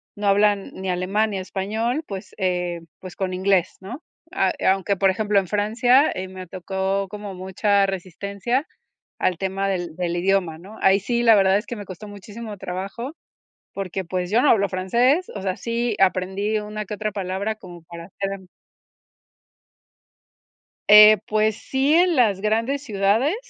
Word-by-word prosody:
no 205 0 -3
hablan 205 0 +2
ni 190 0 -5
alemán, 195 +5 0
ni 195 - -3
español, 220 +9 -2
pues, 195 -2 -8
eh, 180 -3 -1 0.2
pues, 185 -1 -10
con 190 -1 -3
inglés, 185 -1 +1
¿no? 240 - -8 0.3
A 190 -1 +1
e - - -3
aunque, 195 +1 +2
por 195 0 +3
ejemplo, 205 +1 +2
en 190 - -4
Francia, 235 - +3
eh, 185 +1 -5
me 185 0 -9
tocó 190 +2 -2
como 205 0 -7
mucha 195 +2 +1
resistencia 200 - -3 0.5
al 180 - 0
tema 195 +1 -1
del 175 -4 -3
del 175 0 -2
idioma, 180 -3 +1
¿no? 200 +5 -12
Ahí 195 +1 +5
sí, 235 +4 -1
la 230 -1 +7
verdad 195 -1 +4
es 210 - -4
que 240 - -6
me 205 - -7
costó 190 +3 -9
muchísimo 205 +2 -9
trabajo 195 - -6 0.6
porque, 190 -1 -4
pues, 180 +1 -3
yo 230 +3 +4
no 295 - +4
hablo 200 -3 +2
francés, 240 - +1
o 200 - -5
sea, 190 -1 -2
sí 235 -1 -2
aprendí 195 +3 +1
una 210 0 -6
que 210 - -6
otra 215 +1 -3
palabra 195 +2 -3
como 175 -5 -12
para 170 0 -10
hacerm 195 0 -6 2.4
Eh, 210 0 +10
pues, 215 0 +1
sí 270 +3 0
en 350 +1 +4
las 210 -7 +3
grandes 230 +6 0
ciudades, 220 - +1
200 Hz, 165 wpm, -22 LUFS, 185-215 Hz, 2.4 s, Eh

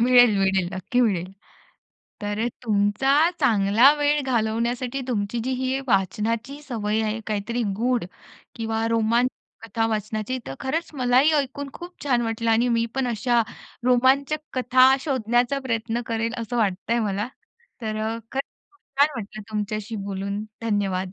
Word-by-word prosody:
मिळेल, 245 -3 +6
मिळेल, 190 -2 +2
नक्की 190 +7 -1
मिळेल. 190 -6 +1 0.9
तर 205 +1 -2
अ, - - +1 0.2
तुमचा 210 +6 +2 0.3
चांगला 220 +4 +5
वेळ 295 0 +2
घालवण्यासाठी 240 +2 -1
तुमची 220 0 -1
जी 260 - -1
ही 260 +1 -1
वाचनाची 220 +8 0
सवय 220 -5 -1
आहे 220 +1 -2
काहीतरी 220 +3 -2
गूढ 245 -2 +1 0.5
किंवा 225 0 -1
रोमांचक 230 +1 -1
कथा 225 +1 0
वाचनाची 215 +3 -2
तर 135 - -5
खरंच 320 +6 -2
मलाही 255 +3 +4
ऐकून 280 +1 -3
खूप 355 +1 -9
छान 245 -4 +2
वाटलं 225 0 -1
आणि 235 +2 +3
मी 230 -1 +2
पण 265 -1 0
अशा 235 +1 +2 0.4
रोमांचक 265 +4 +3 0.2
कथा 255 +1 +5
शोधण्याचा 250 -1 +1
प्रयत्न 230 0 -1
करेल 230 +1 -1
असं 235 +1 -3
वाटतंय 210 +3 0
मला. 205 +1 -1 0.5
तर 215 -1 -2
अ, 225 +1 -2
खरंच 270 +1 -1 0.3
खूप 390 - -31 0.2
छान 290 - +7
वाटलं 215 0 -7
तुमच्याशी 215 +1 -3
बोलून. 200 +1 -3 0.2
धन्यवाद. 195 -4 -1
230 Hz, 140 wpm, -24 LUFS, 215-255 Hz, 0.9 s, छान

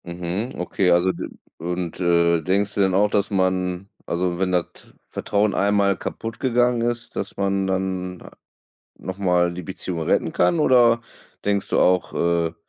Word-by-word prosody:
Mhm. 90 +8 -4
Okay, 90 +1 0
also 90 +2 +3
d 85 - -6 0.3
und, 90 +1 -4
äh, 85 -1 +3
denkst 100 +4 0
du 100 - +1
denn 95 -1 +2
auch, 105 +2 +3
dass 100 +1 +1
man 95 -1 0 0.2
also 90 0 -1
wenn 95 -1 0
das 90 -2 +1 0.4
Vertrauen 105 0 0
einmal 100 -1 +2
kaputt 115 +4 -6
gegangen 120 -1 +2
ist, 120 0 -2
dass - - -4
man 100 -1 0
dann, 95 -1 -2
ah, - - -12 0.7
noch 95 0 -7
mal 90 -3 +2
die 90 +1 -6
Beziehung 90 0 -5
retten - - +1
kann 90 - +2
oder 120 -4 +4 0.4
denkst 100 -1 0
du - - +1
auch, 90 0 +2
äh, 85 -1 0
95 Hz, 165 wpm, -22 LUFS, 90-100 Hz, 0.7 s, oder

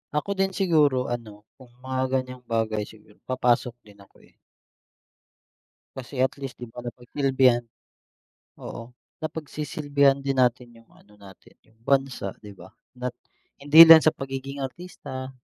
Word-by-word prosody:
Ako 175 +7 -1
din 190 -1 0
siguro 150 -10 +2
ano, 110 -4 -7 0.2
kung 130 - -15 0.2
mga 130 0 -2
gan'yang 130 -1 -3
bagay 110 -2 -1
siguro 105 -1 -18
papasok 125 -1 0
din 105 -1 -19
ako, 100 - -20
eh. - - -24 1.6
Kasi 130 +1 -8
at 130 +1 +2
least, 135 -2 -7
'di 120 - -7
ba, 120 +2 -11
napagsilbihan. 125 0 +1 1.0
Oo, 115 +1 -9 0.3
napagsisilbihan 145 -3 0
din 135 -1 -2
natin 125 0 0
yung 115 - -21
ano 105 +1 -22
natin, 95 -1 -17
yung 110 0 -29
bansa, 135 -7 0
'di 105 - -11
ba? - - -14 0.2
Na 125 0 -3 0.5
hindi 150 +3 +9
lang 160 -1 +10
sa 155 - +3
pagiging 135 +1 -6
artista, 130 -3 -8
130 Hz, 140 wpm, -25 LUFS, 120-140 Hz, 1.6 s, lang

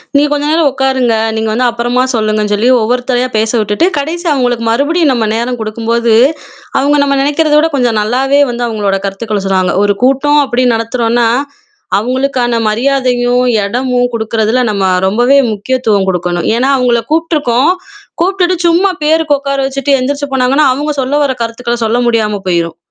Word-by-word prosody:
"நீங்க 290 +1 +3
கொஞ்ச 290 0 -2
நேரம் 320 -2 +3
ஒக்காருங்க 260 -3 0 0.2
நீங்க 220 0 -2
வந்து 250 +3 0
அப்பறமா 240 +2 -1
சொல்லுங்கன்னு" 215 -1 0
சொல்லி 215 +4 +1
ஒவ்வொருத்தரயா 245 +2 0
பேச 220 0 0
விட்டுட்டு, 210 +9 0
கடைசியா 325 +4 -2
அவுங்களுக்கு 245 -4 -1
மறுபடியும் 285 +6 +1
நம்ம 235 -3 0
நேரம் 240 +2 -2
குடுக்கும்போது, 230 +1 -1 0.7
அவுங்க 290 +2 +2
நம்ம 280 -1 0
நெனைக்கிறத 295 +2 +1
விட 320 +2 +1
கொஞ்சம் 240 -5 +1
நல்லாவே 265 +6 +1
வந்து 240 0 -3
அவுங்களோட 205 -3 -1
கருத்துக்கள 205 +1 -4
சொன்னாங்க. 185 -1 +1
"ஒரு 205 0 +1
கூட்டம்" 275 +3 +3
அப்டின் 250 -1 +1
நடத்துறோன்னா, 230 +1 0 0.7
அவுங்களுக்கான 250 +1 -1
மரியாதையும், 250 +1 0 0.2
எடமும் 245 +3 -1
கொடுக்குறதுல, 220 +1 -1
நம்ம 200 -2 -2 0.2
ரொம்பவே 240 +7 +3 0.2
முக்கியத்துவம் 210 -2 -1
குடுக்கணும். 175 -1 -2
ஏன்னா, 260 +3 +1
அவுங்கள 245 -2 +1
கூப்ட்டுருக்கோம் 300 -4 +1 0.5
கூப்டுட்டு, 370 0 +1
சும்மா 355 +4 +2
பேருக்கு 310 -1 +2
ஒக்கார 275 0 -3
வச்சிட்டு, 275 +1 0
எந்திரிச்சு 285 +3 -2
போனாங்கன்னா 265 +3 +2
அவுங்க 295 +3 -3
சொல்ல 265 +3 -1
வர 265 - 0
கருத்துக்கள 235 +1 -3
சொல்ல 230 +2 0
முடியாம 215 -3 0
போயிரும். 170 -2 -1
245 Hz, 150 wpm, -12 LUFS, 225-280 Hz, 0.7 s, நீங்க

